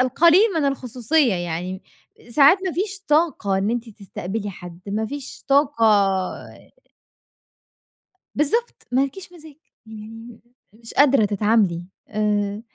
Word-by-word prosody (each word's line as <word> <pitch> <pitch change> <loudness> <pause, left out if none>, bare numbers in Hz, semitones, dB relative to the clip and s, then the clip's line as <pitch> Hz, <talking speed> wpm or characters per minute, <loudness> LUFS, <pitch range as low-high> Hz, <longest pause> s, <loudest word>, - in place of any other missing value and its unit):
القليل 335 - +5
من 310 - +1
الخصوصية 260 -1 +1
يعني، 175 +2 -4 0.5
ساعات 290 +8 +6
ما 365 - -1
فيش 390 +3 -3
طاقة 295 - +1
إن 200 +3 0
أنتِ 240 0 -3
تستقبلي 200 0 -6
حد 175 -2 -11
ما 215 +2 -2
فيش 285 +1 -8
طاقة 275 -4 +3 2.5
بالضبط، 455 - -1
ما 265 +2 +3
لكيش 360 +5 -10
مزاج 315 -3 -14 0.3
يعني 225 +1 -11 0.3
مش 230 +1 -12
قادرة 275 -5 +4
تتعاملي 205 -4 +1 0.2
آآ 210 -1 -1
230 Hz, 115 wpm, -22 LUFS, 205-290 Hz, 2.5 s, ساعات